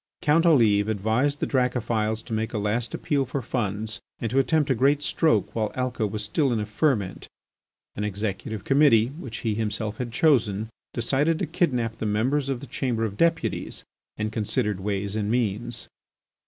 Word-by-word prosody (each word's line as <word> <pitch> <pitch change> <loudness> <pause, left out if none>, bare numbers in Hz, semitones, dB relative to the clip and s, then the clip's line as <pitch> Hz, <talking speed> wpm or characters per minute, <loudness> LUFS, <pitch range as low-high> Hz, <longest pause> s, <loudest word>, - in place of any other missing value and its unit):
Count 165 +3 +4
Olive 110 -9 +4
advised 110 +8 +1
the - - +2
Dracophils 115 -4 0
to 115 - -7
make 110 +2 -2
a - - -1
last 110 +3 -1
appeal 140 -2 0
for 135 +2 -3
funds 110 -1 -2 0.2
and 115 - -3
to 135 - +3
attempt 145 +2 +2
a - - +5
great 140 +4 +2
stroke 160 +1 +1
while 110 -2 -1
Alca 125 -4 -1
was 105 +1 -3
still 135 +6 +1
in 115 - +1
a 105 - -2
ferment. 105 -3 0 0.7
An 105 - -3
executive 105 0 -3
committee, 135 -5 +4
which 135 -6 -8
he 110 - +2
himself 110 0 -2
had 120 -2 -4
chosen, 110 -7 +2 0.3
decided 140 +7 +2
to - - -1
kidnap 120 -9 0
the 110 - -1
members 130 +7 +1
of 130 -3 -2
the - - -7
Chamber 120 -3 -1
of 100 -3 -4
Deputies, 165 +5 0 0.3
and 110 0 -2
considered 105 -2 -1
ways 100 +1 -2
and 105 -1 -1
means. 120 0 -1
115 Hz, 175 wpm, -25 LUFS, 105-135 Hz, 0.7 s, a